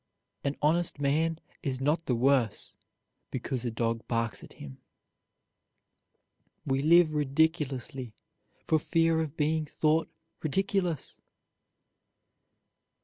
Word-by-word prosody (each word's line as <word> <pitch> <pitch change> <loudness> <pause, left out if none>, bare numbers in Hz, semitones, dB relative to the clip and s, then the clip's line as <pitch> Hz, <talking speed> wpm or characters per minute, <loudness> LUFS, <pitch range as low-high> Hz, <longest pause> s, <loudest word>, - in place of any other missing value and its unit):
"An 140 +1 -1
honest 165 0 +2
man 155 +3 +1 0.2
is 130 -3 -2
not 150 +5 0
the 125 - +2
worse 125 -2 +1 0.5
because 130 -3 -3
a 120 - -1
dog 115 0 -2
barks 115 -2 -1
at - - -12
him." 65 -2 -10 1.9
We 135 -1 +1
live 165 +1 +5
ridiculously 140 -5 0 0.5
for 160 - +3
fear 165 +1 +2
of 155 -1 -5
being 155 +1 +1
thought 155 +2 +1 0.3
ridiculous. 180 0 -1
150 Hz, 100 wpm, -29 LUFS, 130-160 Hz, 1.9 s, live